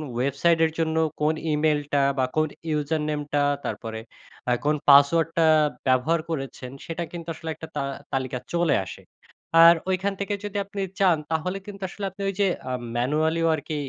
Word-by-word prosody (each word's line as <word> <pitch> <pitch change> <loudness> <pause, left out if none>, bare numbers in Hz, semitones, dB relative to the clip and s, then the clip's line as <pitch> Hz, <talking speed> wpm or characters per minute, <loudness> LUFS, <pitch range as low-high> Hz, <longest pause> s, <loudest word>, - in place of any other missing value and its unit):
ওয়েবসাইটের 160 +6 +2
জন্য 160 -1 0 0.3
কোন 150 +1 +3 0.2
ইমেইলটা 150 -2 +1 0.2
বা 130 - +2
কোন 155 0 +2 0.2
ইউজার 150 0 0
নেমটা 145 -1 -1 0.3
তারপরে 110 -1 -4 0.5
আ - - +3
কোন 150 +1 +3
পাসওয়ার্ডটা 165 +4 +5 0.4
ব্যবহার 130 +6 +3
করেছেন 135 -4 -5
সেটা 165 +1 -4
কিন্তু 170 -1 -8
আসলে 160 +1 -7
একটা 160 - -9
তা - - -1 0.3
তালিকা 130 -1 -1 0.2
চলে 170 -2 +2
আসে। - - -9 0.6
আর 170 +1 +9
ঐখান 190 +2 0
থেকে 200 +1 -2
যদি 205 0 -4
আপনি 200 0 -6 0.2
চান 185 -4 +4
তাহলে 165 +4 -1
কিন্তু 200 -1 -9
আসলে 200 +2 -6
আপনি 190 - -11
ঐ - - +2
যে 200 - +4 0.2
আম 125 -1 -3 0.2
ম্যানুয়ালিও 155 +6 +1
আর 150 - -6
কি 155 - -3
160 Hz, 165 wpm, -25 LUFS, 145-170 Hz, 0.6 s, আর